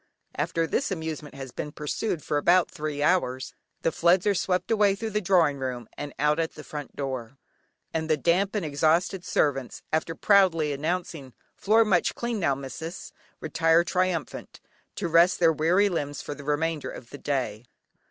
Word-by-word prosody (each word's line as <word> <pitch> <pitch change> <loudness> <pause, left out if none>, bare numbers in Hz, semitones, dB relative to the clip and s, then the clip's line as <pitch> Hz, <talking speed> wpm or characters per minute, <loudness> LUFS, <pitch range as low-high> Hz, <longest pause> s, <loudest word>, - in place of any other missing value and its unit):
After 165 +3 -1
this 250 - -1
amusement 160 -5 -5
has 135 -2 -7
been 150 - -5
pursued 150 +4 -3
for 150 - -1
about 175 +4 +3
three 150 -1 -3
hours, 130 -8 +1 0.3
the 165 - +2
floods 175 +3 +3
are 205 - +4
swept 180 +1 -1
away 205 -3 +4
through 220 +2 -4
the 210 +1 0
drawing 170 -7 +3
room 125 -3 -4
and 145 -1 -6
out 150 +2 +2
at 165 -1 -2
the 150 - -9
front 150 -2 -8
door, 130 -2 -5 0.6
and 160 0 -2
the 155 - +3
damp 185 +7 +1
and 200 -5 -1
exhausted 160 +5 +1
servants, 135 -7 -1
after 160 +1 0
proudly 170 -8 +3
announcing: 155 -3 -3 0.2
"Floor 220 +2 +3
much 185 -5 +2
clean 235 -2 -2
now, 140 -7 +1
missis," 140 +6 -7 0.3
retire 165 +1 +3
triumphant, 180 -4 -2 0.4
to - - -2
rest 170 +2 +4
their 165 -2 +5
weary 175 +7 +3
limbs 145 -6 -3
for - - -5
the 145 - -10
remainder 150 +1 -1
of 120 - -10
the 145 - -9
day. 125 -6 -2
160 Hz, 170 wpm, -26 LUFS, 145-180 Hz, 0.6 s, their